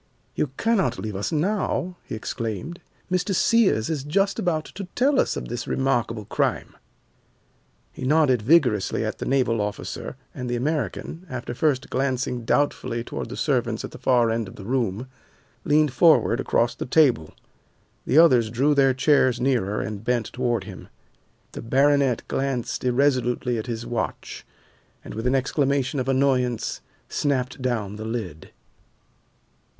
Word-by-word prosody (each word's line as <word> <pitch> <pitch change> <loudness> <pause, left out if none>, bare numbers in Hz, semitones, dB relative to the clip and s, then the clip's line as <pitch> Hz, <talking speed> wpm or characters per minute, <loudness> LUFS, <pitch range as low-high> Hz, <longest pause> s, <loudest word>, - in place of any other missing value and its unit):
"You - - 0
cannot 195 - +1
leave 105 -2 -5
us 100 - -2
now," 180 +2 -1
he - - -5
exclaimed. 115 - -5 0.3
"Mr. 185 +1 0
Sears 200 - +3
is 150 -4 -2
just 195 +7 0
about 160 -3 0
to 195 +1 -8
tell 270 +2 +3
us - - +1
of - - -5
this 120 +1 -5
remarkable 120 -5 0
crime." - - -1 1.2
He - - -9
nodded 140 -4 +3
vigorously 125 - +2
at - - -4
the - - -4
naval 125 -5 +1
officer 105 -1 -5 0.2
and 125 -1 -5
the 120 - -1
American, 155 +6 -3
after 120 -1 -5
first 140 0 0
glancing 130 -2 -1
doubtfully 120 -4 0
toward - - -6
the - - -7
servants 120 -6 0
at - - -9
the - - -11
far 120 -3 +3
end 115 -2 -1
of 95 - -11
the 100 - -10
room, 120 -2 -1 0.6
leaned 150 -2 +3
forward 135 -4 +4
across 120 -2 +1
the - - -6
table. 125 - +3 0.7
The - - +2
others 125 -9 +6
drew 135 +6 +2
their 135 -2 +3
chairs 130 -2 +3
nearer 120 -6 0
and 105 0 -5
bent 120 -2 -1
toward 120 -4 0
him. 95 -2 -10 0.6
The - - -7
baronet 135 0 +2
glanced 135 -3 -2
irresolutely 125 -2 +1
at 110 - -6
his 115 -1 -4
watch, 120 - -4 0.6
and - - -8
with 110 +3 -3
an 130 - +2
exclamation 140 +1 0
of 130 +1 -2
annoyance 130 -3 +1 0.3
snapped 130 -3 -1
down 110 -5 -2
the 110 - -6
lid. 110 -9 -5
125 Hz, 150 wpm, -24 LUFS, 115-145 Hz, 1.2 s, others